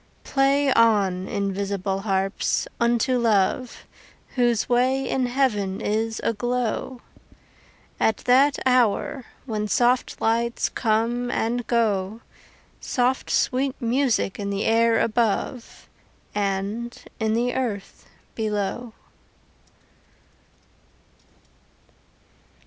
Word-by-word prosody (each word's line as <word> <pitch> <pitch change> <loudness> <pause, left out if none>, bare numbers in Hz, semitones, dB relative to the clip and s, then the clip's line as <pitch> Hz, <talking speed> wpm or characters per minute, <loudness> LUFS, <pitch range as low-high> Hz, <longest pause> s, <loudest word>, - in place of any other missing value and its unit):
Play 275 0 +2
on, 200 -5 +3
invisible 195 -1 -2
harps, 195 -1 -1
unto 240 +2 +2
Love, 230 +2 0 0.5
Whose 240 -3 +1
way 260 +2 +2
in 260 -2 0
heaven 215 -7 0
is 220 +1 -1
aglow 240 +2 -2 1.0
At 220 - +2
that 270 +3 +4
hour 255 +2 +2 0.2
when 215 -4 -2
soft 245 +3 +1
lights 235 +1 0
come 235 +2 0
and 240 0 -1
go, 220 -2 0 0.6
Soft 255 +1 0
sweet 260 +1 0
music 240 -5 0
in 200 -1 -3
the 200 +1 -2
air 230 0 +3
above 230 +2 -1 0.5
And 205 +4 -2 0.2
in 220 -1 +1
the 245 +1 0
earth 215 -7 -4 0.3
below. 215 +2 -3
230 Hz, 85 wpm, -24 LUFS, 205-250 Hz, 1.0 s, that